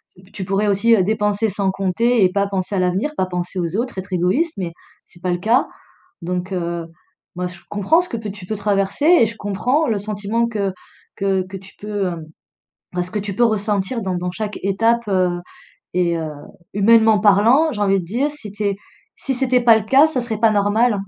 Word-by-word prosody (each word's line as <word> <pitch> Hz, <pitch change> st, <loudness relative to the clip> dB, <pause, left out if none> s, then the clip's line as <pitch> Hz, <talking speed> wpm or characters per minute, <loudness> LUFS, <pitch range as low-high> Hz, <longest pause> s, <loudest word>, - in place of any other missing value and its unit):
p 185 Hz, +1 st, -20 dB
tu 190 Hz, -, -6 dB
pourrais 195 Hz, +3 st, 0 dB
aussi, 205 Hz, +4 st, +3 dB
heu, 205 Hz, -, +3 dB
dépenser 210 Hz, +1 st, 0 dB
sans 195 Hz, 0 st, 0 dB
compter 200 Hz, +5 st, +1 dB
et 180 Hz, -, +4 dB
pas 200 Hz, 0 st, +1 dB
penser 195 Hz, 0 st, -3 dB
à -, -, +1 dB
l'avenir, 185 Hz, +11 st, 0 dB
pas 185 Hz, -, +1 dB
penser 180 Hz, 0 st, -4 dB
aux 170 Hz, 0 st, -2 dB
autres, 235 Hz, 0 st, -2 dB
être 190 Hz, +1 st, -6 dB
égoïste, 185 Hz, -, +1 dB
mais 180 Hz, -3 st, -3 dB, 0.3 s
c'est 170 Hz, -, -18 dB
pas 180 Hz, 0 st, -1 dB
le 175 Hz, -, 0 dB
cas, 225 Hz, +7 st, +2 dB, 0.5 s
donc, 180 Hz, +2 st, -3 dB
heu, 170 Hz, -2 st, -3 dB, 0.5 s
moi 180 Hz, +1 st, -2 dB
je 180 Hz, -1 st, -11 dB
comprends 205 Hz, -, +2 dB
ce 355 Hz, -, -9 dB
que 235 Hz, -, -3 dB
peux 220 Hz, -2 st, -5 dB
tu 195 Hz, -2 st, -11 dB
peux 215 Hz, +4 st, -3 dB
traverser 200 Hz, +6 st, 0 dB
et 340 Hz, -8 st, +6 dB
je 225 Hz, 0 st, -5 dB
comprends 245 Hz, +10 st, 0 dB
le 220 Hz, -, +1 dB
sentiment 210 Hz, +3 st, -1 dB
que 205 Hz, -4 st, -2 dB, 0.4 s
que 195 Hz, -1 st, 0 dB
que 195 Hz, +1 st, -7 dB
tu 190 Hz, 0 st, -15 dB
peux, 205 Hz, -2 st, -2 dB
hem, 170 Hz, -3 st, -5 dB, 0.7 s
bah, 180 Hz, 0 st, -1 dB
ce 180 Hz, -, -7 dB
que 210 Hz, -, -2 dB
tu 200 Hz, -1 st, -4 dB
peux 240 Hz, -, 0 dB
ressentir 215 Hz, +1 st, 0 dB
dans 190 Hz, -2 st, -2 dB
dans 180 Hz, 0 st, -2 dB
chaque 210 Hz, +2 st, -5 dB
étape, 225 Hz, +5 st, +2 dB
heu, 180 Hz, -2 st, +1 dB, 0.5 s
et 175 Hz, -2 st, +1 dB
heu, 160 Hz, -2 st, -4 dB, 0.4 s
humainement 220 Hz, +1 st, +5 dB
parlant, 220 Hz, +10 st, +4 dB
j'ai 210 Hz, -6 st, -4 dB
envie 195 Hz, -1 st, +3 dB
de 175 Hz, -, -6 dB
dire, 255 Hz, -, -1 dB
si 220 Hz, -9 st, -10 dB
tu 210 Hz, +1 st, -5 dB
es 200 Hz, -1 st, +1 dB, 0.4 s
si 270 Hz, -, -2 dB
c'était 255 Hz, -1 st, +2 dB
pas 230 Hz, -2 st, +6 dB
le 220 Hz, -, -3 dB
cas, 270 Hz, +6 st, +6 dB
ça 270 Hz, -5 st, -2 dB
serait 225 Hz, -3 st, -4 dB
pas 225 Hz, -1 st, +4 dB
normal. 210 Hz, +1 st, +2 dB
205 Hz, 220 wpm, -20 LUFS, 185-225 Hz, 0.7 s, et